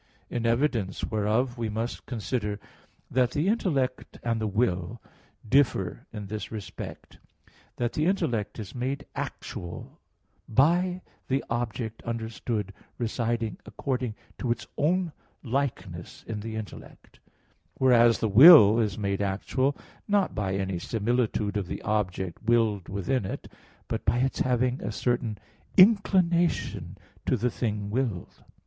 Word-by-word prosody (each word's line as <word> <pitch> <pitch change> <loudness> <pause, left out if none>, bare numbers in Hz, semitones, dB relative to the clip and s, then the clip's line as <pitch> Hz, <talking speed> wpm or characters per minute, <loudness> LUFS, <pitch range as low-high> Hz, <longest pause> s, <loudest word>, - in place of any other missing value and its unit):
In 120 -1 -1
evidence 115 -5 0
whereof 115 +4 0
we 115 -2 -1
must 115 +3 -4
consider 110 -3 -2 0.5
that 125 -1 +3
the 150 +7 0
intellect 145 - 0
and 115 -1 0
the 110 - 0
will 105 -1 0 0.5
differ 120 -7 +2
in 105 -2 -6
this 105 0 -5
respect, 100 -5 -8 0.6
that 120 -1 -1
the 155 +2 +1
intellect 115 - 0
is 105 -4 -7
made 130 +3 -3
actual 85 0 -6 0.5
by 175 +9 +3 0.2
the 135 +1 0
object 115 -1 -3
understood 115 -3 -3 0.2
residing 115 -1 -1
according 125 +1 -3 0.2
to 120 - -1
its 115 -2 -2
own 175 +3 +1 0.3
likeness 115 -10 -3
in 110 -2 -3
the 110 +1 -5
intellect; 110 -1 -9 0.6
whereas 120 -3 +5
the 110 - 0
will 115 - +9
is 105 -4 0
made 100 -2 -1
actual, 130 +8 0 0.3
not 205 -2 +2
by 95 -3 -1
any 95 -2 -2
similitude 110 0 0
of 100 -3 -2
the - - -5
object 95 -4 -1
willed 110 -4 +2
within 100 +6 -1
it, 95 - -6 0.4
but - - -3
by 120 - +2
its 130 +2 0
having 125 0 +1
a - - -3
certain 120 -1 -1 0.4
inclination 185 -4 +3 0.3
to - - +1
the 125 0 0
thing 105 -3 -2
willed. 115 -7 -3
115 Hz, 130 wpm, -27 LUFS, 105-130 Hz, 0.6 s, will